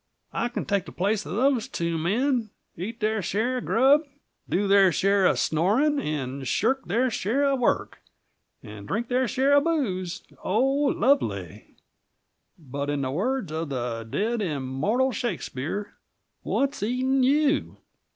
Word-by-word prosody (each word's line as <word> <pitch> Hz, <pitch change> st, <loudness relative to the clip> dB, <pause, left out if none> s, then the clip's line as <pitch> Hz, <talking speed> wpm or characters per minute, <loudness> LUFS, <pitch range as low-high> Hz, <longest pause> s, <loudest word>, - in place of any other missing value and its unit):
I 240 Hz, -, -1 dB
can 240 Hz, -, -4 dB
take 200 Hz, -2 st, 0 dB
the -, -, -9 dB
place 205 Hz, +3 st, 0 dB
of -, -, -4 dB
those 255 Hz, 0 st, +2 dB
two 170 Hz, 0 st, -2 dB
men; 225 Hz, -, 0 dB, 0.3 s
eat 220 Hz, +7 st, -6 dB
their 215 Hz, 0 st, +1 dB
share 225 Hz, +8 st, -1 dB
of -, -, -8 dB
grub, 270 Hz, +6 st, +4 dB, 0.5 s
do 200 Hz, +2 st, +1 dB
their 195 Hz, -2 st, +6 dB
share 195 Hz, +3 st, +3 dB
of -, -, +2 dB
snoring, 225 Hz, -, +2 dB
and 140 Hz, -, -3 dB
shirk 265 Hz, -, +1 dB
their 245 Hz, +3 st, +1 dB
share 235 Hz, +7 st, 0 dB
of 275 Hz, -1 st, +1 dB
work, 245 Hz, -, 0 dB, 0.6 s
and 105 Hz, -1 st, -10 dB
drink 225 Hz, +4 st, -2 dB
their 255 Hz, 0 st, +1 dB
share 270 Hz, +3 st, +2 dB
of 285 Hz, 0 st, +5 dB
booze 205 Hz, -, -1 dB, 0.2 s
oh, 195 Hz, -, 0 dB
lovely! 270 Hz, -, 0 dB, 0.8 s
But, 140 Hz, -2 st, -5 dB
in 145 Hz, -1 st, -1 dB
the 130 Hz, -, -2 dB
words 240 Hz, -, -1 dB
of 160 Hz, 0 st, -3 dB
the 120 Hz, -3 st, -3 dB
dead, 215 Hz, -, -1 dB
immortal 165 Hz, -, 0 dB
Shakespeare, 200 Hz, -, -4 dB, 0.5 s
'What's 275 Hz, +1 st, -1 dB
eating 255 Hz, +5 st, +1 dB
you?' 290 Hz, +3 st, +2 dB
215 Hz, 150 wpm, -25 LUFS, 165-260 Hz, 0.8 s, their